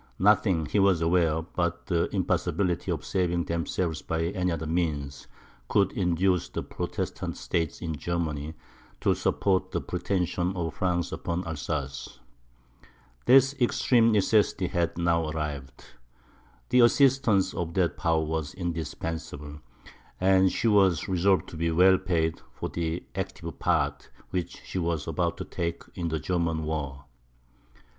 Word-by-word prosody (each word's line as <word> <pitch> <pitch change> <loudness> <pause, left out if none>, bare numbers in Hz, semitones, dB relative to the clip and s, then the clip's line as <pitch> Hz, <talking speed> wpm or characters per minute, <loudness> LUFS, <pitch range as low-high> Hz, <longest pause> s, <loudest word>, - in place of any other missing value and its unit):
Nothing, 95 -4 +3
he 105 - 0
was 95 -3 +4
aware, 80 -1 +2
but 85 0 -2
the 85 -4 +1
impossibility 90 -4 0
of - - -2
saving 85 -2 0
themselves 85 -1 -2
by 80 0 -2
any 90 -1 -1
other 80 -1 -3
means, 75 -5 -2 0.4
could 100 -2 +2
induce 90 0 +1
the - - -4
Protestant - - -4
States 80 -3 -2
in 80 -2 -2
Germany 80 -2 -3 0.5
to - - +3
support 95 -1 +1
the - - -1
pretensions 90 0 -1
of 85 -4 -2
France 85 0 -1
upon 85 +2 -3
Alsace. 75 -3 -4 1.1
This 135 +1 +6
extreme 120 -1 +4
necessity 105 -3 +2
had 85 -2 -1
now 85 -2 +1
arrived; 70 -4 -5 0.9
the 125 - +4
assistance 125 -4 +4
of 85 -1 -4
that 90 -3 +2
power 80 -1 +1
was 80 -1 -3
indispensable, 80 -4 -5 0.6
and 95 0 +4
she 115 - 0
was 95 -6 +4
resolved 95 0 +2
to 80 - -9
be 85 +1 0
well 90 +3 +5
paid 80 -2 0
for - - -4
the 85 0 -3
active - - -5
part - - 0 0.2
which 90 -2 -4
she 95 - -4
was 85 -3 -1
about - - -1
to - - -5
take 85 -1 -3
in 85 -2 -3
the 80 -1 -1
German 85 -2 -1
war. 70 -3 -4
85 Hz, 135 wpm, -27 LUFS, 80-95 Hz, 1.1 s, This